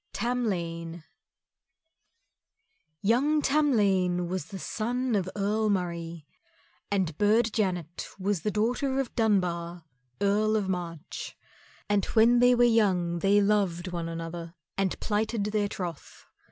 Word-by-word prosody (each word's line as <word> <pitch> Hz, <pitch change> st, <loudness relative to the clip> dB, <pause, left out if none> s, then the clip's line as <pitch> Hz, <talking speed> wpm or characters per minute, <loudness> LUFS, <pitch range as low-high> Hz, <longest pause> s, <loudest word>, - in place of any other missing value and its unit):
Tamlane 170 Hz, -8 st, -2 dB, 2.0 s
Young 270 Hz, +9 st, +3 dB
Tamlane 200 Hz, -, +2 dB
was 185 Hz, -3 st, -3 dB, 0.2 s
son 245 Hz, +3 st, -2 dB
of 190 Hz, -3 st, 0 dB
Earl 210 Hz, +2 st, 0 dB
Murray, 170 Hz, -4 st, -3 dB, 0.6 s
and 185 Hz, -6 st, 0 dB
Burd 220 Hz, +2 st, +3 dB
Janet 180 Hz, -6 st, -2 dB
was 195 Hz, -2 st, -1 dB
daughter 240 Hz, +6 st, 0 dB
of 270 Hz, -3 st, -2 dB
Dunbar, 175 Hz, -6 st, 0 dB, 0.4 s
Earl 210 Hz, +2 st, +2 dB
of 205 Hz, -3 st, 0 dB
March. 175 Hz, -3 st, -5 dB, 0.5 s
And 205 Hz, -1 st, +2 dB
when 235 Hz, +2 st, +6 dB
they 245 Hz, 0 st, +6 dB
were 245 Hz, -, +4 dB
young 190 Hz, -7 st, +2 dB
they 200 Hz, +3 st, +4 dB
loved 195 Hz, -4 st, +1 dB
one 170 Hz, -2 st, -4 dB
another 165 Hz, +1 st, -6 dB, 0.2 s
and 195 Hz, -2 st, -1 dB
plighted 215 Hz, 0 st, -1 dB
their 210 Hz, 0 st, 0 dB
troth. 175 Hz, -6 st, -7 dB
200 Hz, 115 wpm, -28 LUFS, 175-220 Hz, 2.0 s, when